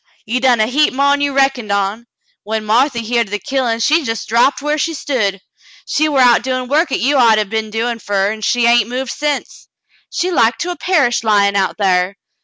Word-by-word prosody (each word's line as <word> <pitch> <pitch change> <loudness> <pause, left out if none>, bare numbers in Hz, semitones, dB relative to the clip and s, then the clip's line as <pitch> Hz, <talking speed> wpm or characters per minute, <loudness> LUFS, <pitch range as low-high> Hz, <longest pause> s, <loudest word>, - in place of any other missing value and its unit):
You 240 +4 -1
done 250 -2 +2
a 215 - +3
heap 270 +4 +1
mo'n 280 +1 +2
you 285 0 0
reckoned 270 -5 0
on. 200 +4 -2 0.3
When 220 +1 -4
Marthy 235 +2 +1
heered 235 0 0
o' - - -14
the 205 - -2
killin', 235 +1 -2
she 315 +7 +3
jes' 225 -6 -4
drapped 235 +5 +2
whar 295 +1 -1
she 330 +2 -1
stood. 205 -10 -2 0.4
She 310 +1 0
war 275 -3 +2
out 245 -2 +5
doin' 255 0 -3
work 300 +4 +1
'at - - -1
you'd 280 +3 +2
ought 230 -3 +5
to 215 - +1
'a' - - -2
been 220 +1 -4
doin' 230 +2 -3
fer 200 -2 -1
her, 200 - 0
an' 220 0 -7
she 240 +3 +1
hain't 235 -2 +3
moved 255 0 -4
sence. 295 -1 -4 0.4
She 365 - -2
like 235 -8 +2
to 355 - -3
'a' - - -5
perished 295 -12 0
lyin' 200 -2 +2
out 195 -1 0
thar. 185 -1 +1
240 Hz, 225 wpm, -16 LUFS, 215-275 Hz, 0.4 s, out